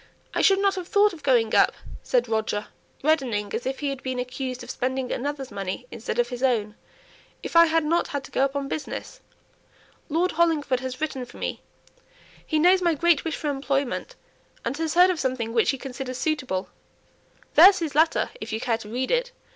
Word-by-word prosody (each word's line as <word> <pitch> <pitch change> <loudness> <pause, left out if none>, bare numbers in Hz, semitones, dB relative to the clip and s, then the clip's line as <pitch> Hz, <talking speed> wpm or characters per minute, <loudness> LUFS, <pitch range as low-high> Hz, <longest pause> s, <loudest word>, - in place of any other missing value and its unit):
"I - - +1
shouldn't 395 0 +4
have 370 -3 -5
thought 410 0 +4
of 325 - -11
going 245 -6 +2
up," - - +5 0.3
said - - +1
Roger, 215 -1 -2 0.3
reddening 250 -10 +1
as 245 - -3
if 265 +2 -3
he 285 - 0
had 275 -1 -5
been 260 -1 -3
accused 255 0 -4
of - - -6
spending 260 0 -2
another's 275 0 -3
money 195 +4 -4
instead 235 - -5
of 240 0 +1
his 245 -1 -6
own, 225 -6 +1 0.7
"if - - -6
I 335 0 +8
hadn't 325 +1 +1
had 285 -1 -4
to - - -12
go 265 - +1
up 275 0 0
on 280 -1 -2
business. 315 - -5 0.9
Lord 345 +4 +1
Hollingford 310 -6 +1
has 260 +1 -6
written 275 -4 -2
for 245 - -12
me; - - -4 0.8
he 315 - -1
knows 360 +4 +5
my 340 -2 +2
great 335 0 +3
wish 325 - -2
for 295 - -2
employment, 275 -1 -2 0.5
and - - -1
has 320 0 -2
heard 360 +1 +7
of 350 - -3
something 250 -4 -2
which 230 -2 +3
he 270 - +1
considers 255 -1 -6
suitable; 260 -13 -2 0.8
there's 385 0 +8
his 330 -5 -3
letter 320 +3 +2
if 220 +2 -6
you 220 - -2
care 230 -1 0
to 210 - -10
read 255 +3 -2
it. - - +1
275 Hz, 195 wpm, -25 LUFS, 250-325 Hz, 0.9 s, I